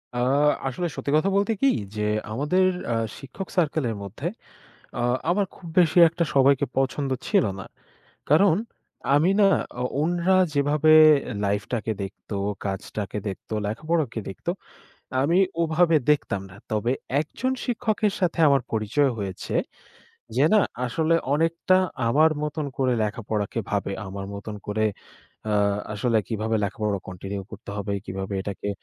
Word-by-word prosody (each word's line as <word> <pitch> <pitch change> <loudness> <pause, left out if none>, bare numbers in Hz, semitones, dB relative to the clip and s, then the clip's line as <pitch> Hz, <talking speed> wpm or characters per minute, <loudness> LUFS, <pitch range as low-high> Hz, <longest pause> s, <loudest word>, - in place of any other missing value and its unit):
আ - - -1 0.5
আসলে 170 +7 -2
সত্যি 140 - -3
কথা 185 +6 +2
বলতে 200 +3 +2
কি? 275 - +5 0.3
যে 105 - -2 0.3
আমাদের 150 +10 +2 0.3
আ - - 0 0.2
শিক্ষক 145 +8 -8
সার্কেলের 150 -8 +1
মধ্যে 110 - -5 0.7
আ - - 0 0.3
আমার 195 +3 +2
খুব 175 - -12
বেশি 170 -1 +3
একটা 170 +1 -1
সবাইকে 135 0 +4
পছন্দ 135 +1 0 0.2
ছিল - - +3
না। - - -7 0.6
কারণ 160 +4 +5 0.6
আমি 155 +5 +4
না 200 - +7 0.3
আ - - -2 0.2
উনারা 175 +3 +2 0.2
যেভাবে 145 +2 +3 0.5
লাইফটাকে 105 +3 -1
দেখত, 95 0 -10 0.4
কাজটাকে 100 +1 -4
দেখত, 95 - -7 0.2
লেখাপড়াকে 145 +2 -1
দেখতো। 95 - -4 0.7
আমি 165 +6 +2 0.2
ওভাবে 165 +1 +3 0.2
দেখতাম 100 -9 0
না। 90 - -14 0.2
তবে 110 +3 0 0.3
একজন 230 - -2
শিক্ষকের 220 -4 0
সাথে 175 -3 0
আমার 140 -2 +4
পরিচয় 115 +6 +1
হয়েছে, 100 -3 -5 0.8
যে 135 - +4
না, 215 - +6 0.3
আসলে 160 +6 +1 0.2
অনেকটা 165 +4 +2 0.3
আমার 155 +7 +5
মতন 150 0 -2
করে 130 -2 +2
লেখাপড়াকে 105 -1 -2
ভাবে। 100 -1 -1
আমার 95 +1 -6
মতন 105 +1 -6
করে 110 +1 0 0.7
আ - - +2 0.4
আসলে 115 +2 +1
কিভাবে 110 0 -1
লেখাপড়া 105 0 -1
কন্টিনিউ 95 +2 -5
করতে 105 -1 -9
হবে? 100 0 -3
কিভাবে 95 +1 -4
এটাকে 100 +1 -5
135 Hz, 135 wpm, -25 LUFS, 105-165 Hz, 0.8 s, না